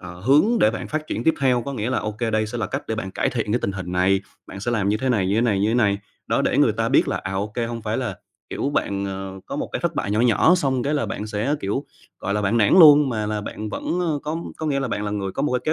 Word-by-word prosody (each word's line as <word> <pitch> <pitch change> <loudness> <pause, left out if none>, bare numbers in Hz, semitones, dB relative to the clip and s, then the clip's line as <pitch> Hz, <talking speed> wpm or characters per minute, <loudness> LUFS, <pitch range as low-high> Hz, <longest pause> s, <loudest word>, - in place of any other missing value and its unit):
ờ, 90 0 -10
hướng 140 - +4
để 110 - +5
bạn 110 - -6
phát 155 0 -3
triển - - -3
tiếp 160 - +4
theo, 125 -3 +2
có 140 - -5
nghĩa 115 +2 -2
là, - - +1
ô 105 - -3
kê, 115 +1 -2
đây 110 0 +1
sẽ 120 +3 -5
là 115 - -1
cách - - -4
để 110 - -1
bạn 95 -4 -4
cải - - -1
thiện 110 -4 -2
cái 120 - +2
tình 100 - -2
hình 90 -2 -6
này, 95 +2 +2 0.3
bạn 100 - -9
sẽ 120 - -2
làm 105 -5 0
như 105 - +2
thế 130 +4 -2
này, 105 -7 +2
như 100 - +1
thế 115 - +3
này, 105 -5 +1
như 105 - +2
thế 115 - +1
này. 100 -4 +2 0.3
Đó, - - +1
để - - +1
người - - +4
ta - - -1
biết - - +3
là, - - 0
à, 95 - -5
ô 100 +2 -1
kê, 120 -1 -1
hông 115 -1 -5
phải 110 +1 -2
là, 120 -8 -3 0.3
kiểu, 140 - -2
bạn, 100 -8 -1
ờ, 95 0 -6
có - - -5
một - - -2
cái - - -2
thất - - -1
bại 100 - -2
nhỏ 105 - +1
nhỏ, 125 - +4
xong 135 -7 0
cái 145 +4 0
là 145 - 0
bạn 105 - -4
sẽ, 110 +7 -1
kiểu, 105 +9 -2 0.3
gọi 100 +2 -2
là, 105 - 0
bạn 105 +4 +1
nản 105 -3 +3
luôn 150 -3 +8
mà 110 -4 -2
là 105 0 -2
bạn 105 +1 -6
vẫn, 175 +11 -3
ơ 160 -5 0
có 155 +2 -3 0.2
có 160 - -4
nghĩa 140 -2 0
là 135 - -2
bạn 105 -2 -2
là 105 - -2
người 100 -2 -3
có - - -3
một 145 - 0
cái 125 - +1
kế 155 - +2
110 Hz, 330 wpm, -22 LUFS, 100-130 Hz, 0.3 s, luôn